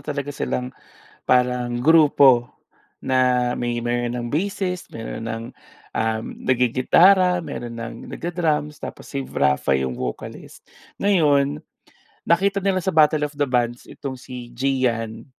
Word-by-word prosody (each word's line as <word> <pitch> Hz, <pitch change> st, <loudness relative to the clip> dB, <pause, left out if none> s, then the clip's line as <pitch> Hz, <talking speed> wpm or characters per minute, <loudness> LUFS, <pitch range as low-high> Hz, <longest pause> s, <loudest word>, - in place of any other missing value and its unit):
talaga 145 Hz, 0 st, -4 dB
silang 125 Hz, -2 st, -3 dB, 0.5 s
parang 125 Hz, -1 st, +1 dB
grupo 140 Hz, -4 st, +5 dB, 0.5 s
na, 125 Hz, -1 st, +2 dB
may 120 Hz, -1 st, -2 dB
mayro'n 120 Hz, 0 st, -1 dB
ng 120 Hz, -, -4 dB
bassist, 180 Hz, +4 st, -3 dB
mayro'n 115 Hz, 0 st, -6 dB
ng 115 Hz, 0 st, -4 dB, 0.5 s
um, 110 Hz, 0 st, 0 dB, 0.2 s
nag-gigitara, 170 Hz, -, +4 dB
mayro'n 120 Hz, -7 st, -6 dB
ng 115 Hz, 0 st, -6 dB, 0.2 s
nagda-drums, 160 Hz, -3 st, -1 dB
tapos -, -, -9 dB
si 135 Hz, -1 st, -4 dB
Rapha 70 Hz, -, +1 dB
'yong 65 Hz, -2 st, 0 dB
vocalist. 60 Hz, -1 st, -7 dB, 0.4 s
Ngayon, 150 Hz, -7 st, +2 dB, 0.7 s
nakita 195 Hz, +3 st, +2 dB
nila 185 Hz, -2 st, 0 dB
sa 190 Hz, -, 0 dB
battle 150 Hz, -1 st, +4 dB
of 145 Hz, -, -7 dB
the 145 Hz, -2 st, -1 dB
bands 120 Hz, -1 st, -1 dB
itong 130 Hz, -2 st, -7 dB
si 125 Hz, -2 st, -9 dB
Gian. 120 Hz, -4 st, -1 dB
130 Hz, 125 wpm, -22 LUFS, 120-155 Hz, 0.7 s, grupo